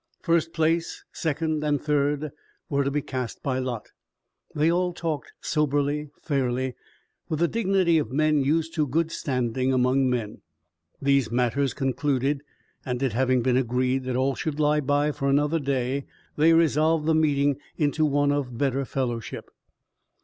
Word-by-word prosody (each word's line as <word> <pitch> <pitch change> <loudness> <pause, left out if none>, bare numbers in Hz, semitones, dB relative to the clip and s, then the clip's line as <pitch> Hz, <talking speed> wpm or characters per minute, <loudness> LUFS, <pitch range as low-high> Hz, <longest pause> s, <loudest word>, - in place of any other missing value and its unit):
First 165 -1 +2
place, 165 +1 0
second 155 -1 -1
and 145 -1 +1
third 150 0 0 0.4
were 140 0 +2
to 140 - 0
be 145 0 -1
cast 130 -3 -5
by 130 -2 0
lot. 125 -4 -4 0.7
They 155 +3 +3
all 180 +1 +1
talked 165 -4 -4
soberly, 145 -1 0
fairly, 130 -3 -1 0.6
with 155 - -1
the 170 +2 +2
dignity 190 -5 +2
of 120 -6 -3
men 155 +1 +2
used 160 +3 0
to 155 -3 0
good 160 +5 0
standing 130 -4 -1
among 130 +1 +2
men. 115 -4 -3 0.6
These 140 -3 +2
matters 125 +3 0
concluded, 135 +1 0 0.4
and 125 0 -3
it 130 -5 0
having 130 0 +2
been 125 0 +2
agreed 130 +1 0
that 130 -1 -2
all 130 +2 +1
should 155 +2 -4
lie 150 0 +3
by 145 +2 +1
for 140 -2 -2
another 145 +4 +2
day, 135 -1 -1 0.3
they 160 +2 +5
resolved 160 -1 +3
the 160 - +3
meeting 145 -3 +2 0.2
into 150 +1 +1
one 145 -1 +2
of 135 -5 -2
better 135 0 0
fellowship. 120 -4 -4
140 Hz, 155 wpm, -25 LUFS, 130-155 Hz, 0.7 s, they